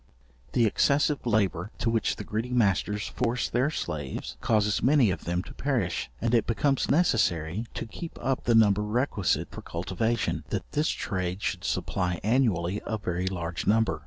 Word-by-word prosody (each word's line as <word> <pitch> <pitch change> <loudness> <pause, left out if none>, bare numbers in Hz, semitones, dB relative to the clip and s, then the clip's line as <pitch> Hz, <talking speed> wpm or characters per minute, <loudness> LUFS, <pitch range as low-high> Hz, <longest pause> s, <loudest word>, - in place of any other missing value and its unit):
The 120 -2 +4
excessive 140 +5 +2
labour 100 -4 +1
to 115 - 0
which 115 -2 +1
the - - -6
greedy 110 +3 -3
masters 105 -3 +1
force 120 0 -1
their 125 +4 +1
slaves, 70 - -4
causes 105 -3 +2
many 130 -6 +4
of - - -5
them 85 +1 -1
to - - -11
perish; 125 -11 -1
and 115 0 0
it 115 -2 +3
becomes 135 +4 +1
necessary, 105 - +2
to - - -3
keep 160 +10 -8
up 130 +1 -1
the 120 - +4
number 105 -2 +5
requisite 105 -2 0
for - - -8
cultivation, 95 +7 -1
that - - -4
this 150 +3 +1
trade 90 0 -2
should 90 -1 -2
supply 90 -1 -1
annually 105 -5 +1
a 110 - -1
very 90 -3 -2
large 85 -2 -3
number. 105 -6 +2
105 Hz, 165 wpm, -27 LUFS, 90-120 Hz, -, number